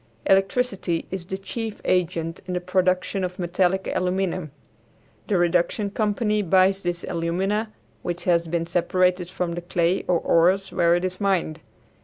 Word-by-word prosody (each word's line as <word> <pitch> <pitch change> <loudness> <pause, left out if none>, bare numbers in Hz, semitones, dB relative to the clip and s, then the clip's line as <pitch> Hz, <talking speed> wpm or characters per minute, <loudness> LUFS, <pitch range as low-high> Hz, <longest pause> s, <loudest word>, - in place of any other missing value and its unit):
Electricity 195 -3 +1
is 185 -2 -4
the 190 - -3
chief 215 +3 -5
agent 165 -2 0
in 180 - -2
the - - +1
production 185 +1 0
of 180 0 -3
metallic 185 +1 0
aluminum. 185 -2 -1 0.8
The 205 - +2
reduction 175 +4 +1
company 210 0 0
buys 190 +1 +3
this 175 -1 -2
alumina, 190 +6 -1 0.3
which 175 0 -4
has 170 -2 +2
been 165 0 -1
separated 180 +1 +1
from 180 -2 -2
the 175 +1 -4
clay 175 +1 0
or 180 - +3
ores 185 +4 +2
where 170 0 +3
it 175 +1 0
is 185 +1 -4
mined. 180 -5 0
180 Hz, 150 wpm, -24 LUFS, 175-195 Hz, 0.8 s, buys